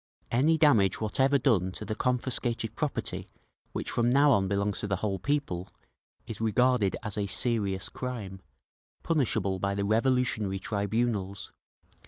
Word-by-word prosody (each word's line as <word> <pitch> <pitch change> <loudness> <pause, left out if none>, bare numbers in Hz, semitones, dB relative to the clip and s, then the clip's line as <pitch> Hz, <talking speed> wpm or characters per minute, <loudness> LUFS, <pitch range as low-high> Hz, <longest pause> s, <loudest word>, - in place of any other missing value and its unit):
Any 150 +7 +3
damage 115 - +4
whatever 135 +6 +2
done 100 -10 +2
to 105 - -7
the 110 - -3
confiscated 120 -2 -1
property 150 -3 -3 0.4
which - - -4
from 120 0 +2
now 140 +3 +5
on 100 -6 +3
belongs 100 +1 -1
to - - -3
the 100 - 0
whole 95 0 -2
People, 100 -8 -2 0.6
is 110 - -7
regarded 115 -2 +2
as 105 -1 -4
a 100 - -1
serious 100 -3 -1
crime, 105 -7 -6 0.6
punishable 110 - 0
by 100 +1 -1
the 100 0 -1
revolutionary 110 -3 +1
tribunals. 100 -1 -2
110 Hz, 140 wpm, -28 LUFS, 100-125 Hz, 0.6 s, now